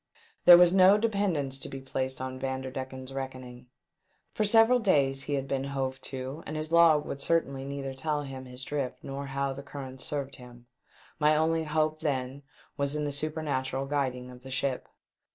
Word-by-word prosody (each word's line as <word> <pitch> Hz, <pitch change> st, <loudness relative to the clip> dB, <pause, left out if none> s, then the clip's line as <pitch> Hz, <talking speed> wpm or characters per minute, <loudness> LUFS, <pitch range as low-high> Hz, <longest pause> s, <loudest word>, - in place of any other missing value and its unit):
There 175 Hz, -1 st, +11 dB
was 175 Hz, 0 st, +6 dB
no 190 Hz, +1 st, +7 dB
dependence 195 Hz, -11 st, 0 dB
to -, -, -6 dB
be 135 Hz, -, -6 dB
placed 130 Hz, 0 st, -3 dB
on 130 Hz, 0 st, -5 dB
Vander 130 Hz, 0 st, -3 dB
decken's 130 Hz, 0 st, -6 dB
reckoning. 130 Hz, -2 st, -7 dB, 0.7 s
For 215 Hz, -, 0 dB
several 225 Hz, +4 st, +5 dB
days 140 Hz, -, +2 dB
he 145 Hz, -, -1 dB
had 135 Hz, 0 st, -2 dB
been 135 Hz, 0 st, -1 dB
hove 135 Hz, -1 st, -3 dB
to, 135 Hz, +4 st, -6 dB
and 155 Hz, -, -4 dB
his 155 Hz, +1 st, -4 dB
log 165 Hz, -3 st, +6 dB
would 140 Hz, -, -5 dB
certainly 140 Hz, -4 st, 0 dB
neither 140 Hz, -1 st, -4 dB
tell 150 Hz, +2 st, -2 dB
him 135 Hz, -2 st, -7 dB
his 125 Hz, 0 st, -8 dB
drift 140 Hz, -2 st, -3 dB
nor 140 Hz, +1 st, -5 dB
how 135 Hz, 0 st, -1 dB
the 135 Hz, -, -8 dB
currents 135 Hz, -2 st, -8 dB
served 140 Hz, -2 st, -4 dB
him. 120 Hz, -2 st, -14 dB, 0.5 s
My 155 Hz, 0 st, +4 dB
only 160 Hz, +1 st, +1 dB
hope 155 Hz, 0 st, 0 dB
then 135 Hz, -3 st, -2 dB, 0.4 s
was 140 Hz, +1 st, -1 dB
in 150 Hz, 0 st, -1 dB
the 145 Hz, -, -2 dB
supernatural 140 Hz, -3 st, -2 dB
guiding 130 Hz, -3 st, -2 dB
of 125 Hz, 0 st, -13 dB
the 130 Hz, -, -10 dB
ship. 135 Hz, -1 st, -2 dB
140 Hz, 185 wpm, -29 LUFS, 130-155 Hz, 0.7 s, There